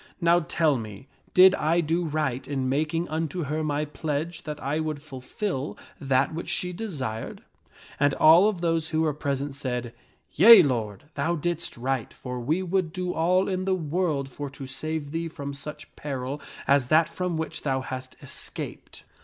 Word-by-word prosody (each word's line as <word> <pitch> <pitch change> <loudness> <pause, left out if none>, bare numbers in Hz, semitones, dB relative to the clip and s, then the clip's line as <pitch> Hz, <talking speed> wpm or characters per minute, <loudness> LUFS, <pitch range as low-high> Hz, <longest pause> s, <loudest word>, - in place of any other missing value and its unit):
Now 170 -1 +4
tell 155 -3 +1
me, 110 +1 -8 0.3
did 185 +1 +9
I 165 -1 +2
do 170 +2 +1
right 150 -5 -1
in 135 -2 -1
making 155 +5 0
unto 160 +2 -2
her 155 +2 -2
my 150 0 0
pledge 160 +3 -4
that 150 -1 -5
I 145 +3 -1
would 155 -2 -2
fulfil 145 +2 -4 0.2
that 135 +1 +1
which 165 - -5
she 180 0 -1
desired? 140 - -5 0.3
" - - -21
And 145 -1 +3
all 170 +6 +7
of 190 -5 -4
those 165 -2 0
who 160 0 +1
were 155 -2 +2
present 140 -1 -2
said, 125 -3 -4 0.2
" - - -40
Yea, 210 +3 +10
lord, 110 -8 -2
thou 160 +5 0
didst 170 -1 -3
right, 130 -1 -2
for 125 -1 -6
we 155 +10 0
would 185 -2 0
do 180 +1 -3
all 180 +4 +2
in 185 -1 -1
the 190 -1 +2
world 160 -4 -1
for 140 +2 -6
to 135 0 -9
save 150 +2 -4
thee 165 +1 -2
from 140 -3 -6
such 150 +2 -8
peril 135 0 -4 0.3
as 140 -3 +4
that 155 +3 +5
from 180 0 -3
which 160 0 -4
thou 135 -2 0
hast 130 0 -6
es - - -6
caped." - - -8
155 Hz, 185 wpm, -26 LUFS, 135-170 Hz, 0.3 s, Yea